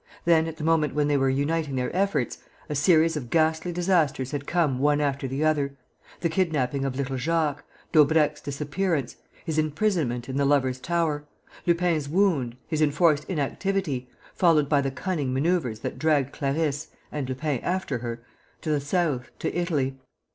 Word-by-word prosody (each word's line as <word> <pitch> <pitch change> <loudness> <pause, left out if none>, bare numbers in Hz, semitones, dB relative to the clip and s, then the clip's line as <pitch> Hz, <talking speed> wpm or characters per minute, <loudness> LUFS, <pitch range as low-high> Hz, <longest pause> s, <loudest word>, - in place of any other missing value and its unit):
Then, 165 -1 +4
at 160 -1 -6
the 155 - -6
moment 155 -3 +2
when 150 -1 +2
they 145 - +2
were 135 -1 +2
uniting 145 +2 0
their 125 +5 -2
efforts, 195 -10 0 0.3
a - - -1
series 160 +2 +4
of 130 -6 -5
ghastly 160 +3 +2
disasters 165 -7 +1
had 145 -1 -4
come 155 -7 +1
one 145 +1 +3
after 140 -2 -1
the 135 +4 -1
other: 140 -3 +1 0.4
the 170 - +2
kidnapping 150 -6 0
of 135 -1 -2
little 135 -1 -2
Jacques, 150 +1 0 0.3
Daubrecq's 150 0 +4
disappearance, 145 0 -2 0.3
his 160 -2 0
imprisonment 155 - 0
in 135 0 -3
the 140 - +2
Lovers' 130 -3 +2
Tower, 160 -1 -1 0.4
Lupin's 170 -4 +1
wound, 150 -10 +1
his 155 -1 -1
enforced 150 0 +3
inactivity, 155 -4 -2 0.2
followed 160 -5 +3
by 145 -1 +3
the 135 - -1
cunning 145 -1 -2
manoeuvres 140 -6 0
that - - -5
dragged 145 -4 +2
Clarisse 145 +1 -1 0.2
and 140 -3 -3
Lupin 135 0 -1
after 175 -7 -2
her 120 0 -5 0.4
to 155 - -2
the 145 -1 +1
south, 145 -4 0
to - - -3
Italy. 145 -7 -1
150 Hz, 165 wpm, -26 LUFS, 135-165 Hz, 0.4 s, Then